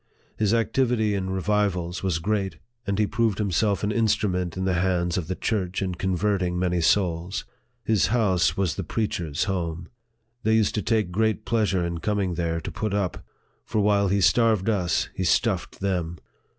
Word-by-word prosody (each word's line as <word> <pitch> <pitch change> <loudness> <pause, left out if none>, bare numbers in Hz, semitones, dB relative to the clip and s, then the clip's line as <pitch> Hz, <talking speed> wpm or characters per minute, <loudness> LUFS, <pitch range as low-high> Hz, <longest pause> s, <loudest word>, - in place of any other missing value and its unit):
His 105 -2 +1
activity 115 -1 +1
in 95 -1 -2
revivals 95 -2 0
was 95 -4 0
great, 95 -1 -1 0.3
and 100 0 0
he 105 - +3
proved 110 -1 0
himself 100 -1 +1
an 105 - +1
instrument 95 -5 0
in 95 - -1
the 95 - +1
hands 90 -1 +1
of 90 -5 -2
the 95 - -2
church 95 -4 -1
in 95 -2 -2
converting 90 0 0
many 90 -1 0
souls. 90 +1 +1 0.4
His 110 -3 +2
house 105 -7 +2
was 95 -6 0
the - - -2
preachers' 85 -8 -2
home. 85 -3 -3 0.5
They 110 +1 +2
used 110 -2 +2
to 105 - -1
take 110 -5 0
great 110 +3 0
pleasure 105 -6 +1
in 85 -1 -3
coming 100 -1 -1
there 85 -1 -1
to - - -6
put 105 -2 -2
up; 100 -3 -2 0.4
for 110 - -2
while 100 -1 +3
he 100 +1 +1
starved 115 0 +3
us, 90 -6 +1
he 95 - -3
stuffed 90 - 0
them. 90 -4 -1
95 Hz, 175 wpm, -25 LUFS, 90-105 Hz, 0.5 s, he